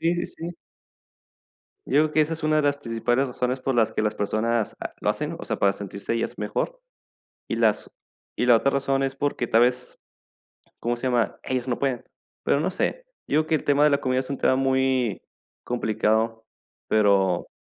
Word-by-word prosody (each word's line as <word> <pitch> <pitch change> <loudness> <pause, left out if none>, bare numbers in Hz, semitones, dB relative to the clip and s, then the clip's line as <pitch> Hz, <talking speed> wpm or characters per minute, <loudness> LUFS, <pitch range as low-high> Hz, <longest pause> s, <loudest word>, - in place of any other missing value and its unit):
Sí, 170 +1 +2
sí, 175 0 -2
sí. 165 +1 -6 1.4
Yo - - -6
digo 155 - 0
que 155 - +3
esa 155 +1 +1
es 160 - -10
una 155 0 +2
de 155 - +3
las 145 0 +2
principales 120 0 0
razones 125 0 -2
por 135 0 -1
las 115 -2 +2
que - - -1
las 105 -1 0
personas, 110 +2 -1
ah, - - -5
lo - - -1
hacen, - - -3
o - - -7
sea, - - -2
para 100 - +3
sentirse 100 +1 -5
ellas 115 - -2
mejor, - - -3 0.7
y - - -1
las - - +1 0.5
y 125 - +1
la 120 -2 +7
otra 135 +4 +2
razón 135 0 0
es 135 0 -1
porque, 140 -3 -1
tal 115 +1 +4
vez, 125 0 0 0.8
¿cómo 120 +1 -1
se 130 - -2
llama? 120 -4 0
Ellos 130 -1 -2
no 120 - -1
pueden. 130 -4 -1 0.4
Pero 140 - +2
no 155 - 0
sé, - - -2 0.2
yo 150 - +3
digo 155 - -1
que 160 - +2
el - - -2
tema 145 0 +3
de 150 - +6
la 140 -1 +2
comida 130 0 0
es 130 - -5
un 140 - -2
tema - - +3
muy 130 -4 +1 0.4
complicado, 110 -1 0 0.4
pero 100 -4 +3
130 Hz, 205 wpm, -25 LUFS, 115-140 Hz, 1.4 s, la